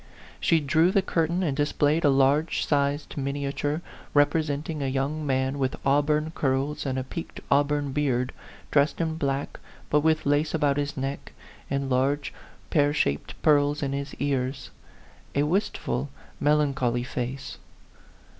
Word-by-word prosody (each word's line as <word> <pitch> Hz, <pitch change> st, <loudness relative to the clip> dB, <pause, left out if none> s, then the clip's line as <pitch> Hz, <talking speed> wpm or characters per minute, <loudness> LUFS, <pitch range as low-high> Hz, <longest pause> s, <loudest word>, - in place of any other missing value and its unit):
She 165 Hz, -, +3 dB
drew 160 Hz, +4 st, +3 dB
the 195 Hz, 0 st, +2 dB
curtain 170 Hz, +2 st, 0 dB
and 145 Hz, -6 st, 0 dB
displayed 145 Hz, +2 st, +1 dB
a 145 Hz, -, +5 dB
large 140 Hz, +4 st, +2 dB
sized 145 Hz, 0 st, 0 dB
miniature, 140 Hz, +3 st, -2 dB, 0.3 s
represent 145 Hz, 0 st, +2 dB
ing 155 Hz, -3 st, -4 dB
a 135 Hz, -, 0 dB
young 140 Hz, +3 st, -1 dB
man, 130 Hz, +1 st, 0 dB
with 130 Hz, -1 st, 0 dB
auburn 150 Hz, +3 st, +2 dB
curls 140 Hz, +1 st, -1 dB
and 130 Hz, -1 st, -1 dB
a 130 Hz, -, -1 dB
peaked 165 Hz, +5 st, -7 dB
auburn 145 Hz, 0 st, +2 dB
beard, 130 Hz, -3 st, 0 dB, 0.4 s
dressed 145 Hz, 0 st, +2 dB
in 160 Hz, -1 st, -1 dB
black, 140 Hz, -2 st, -2 dB, 0.3 s
but 150 Hz, -, +5 dB
with 155 Hz, +1 st, +2 dB
lace 145 Hz, +3 st, +2 dB
about 145 Hz, -3 st, +2 dB
his 145 Hz, 0 st, -2 dB
neck, 135 Hz, +1 st, -4 dB, 0.4 s
and 140 Hz, 0 st, -1 dB
large, 135 Hz, +3 st, 0 dB, 0.4 s
pear 145 Hz, -1 st, +3 dB
shaped 70 Hz, -, -1 dB
pearls 145 Hz, -1 st, +3 dB
in 135 Hz, -1 st, -1 dB
his 140 Hz, +1 st, -4 dB
ears: 135 Hz, -1 st, -2 dB, 0.6 s
a 140 Hz, -, +3 dB
wistful, 150 Hz, -, -1 dB, 0.3 s
melan 150 Hz, -1 st, +3 dB
choly 120 Hz, -1 st, 0 dB
face. 125 Hz, +2 st, -5 dB
145 Hz, 145 wpm, -26 LUFS, 135-150 Hz, 0.6 s, a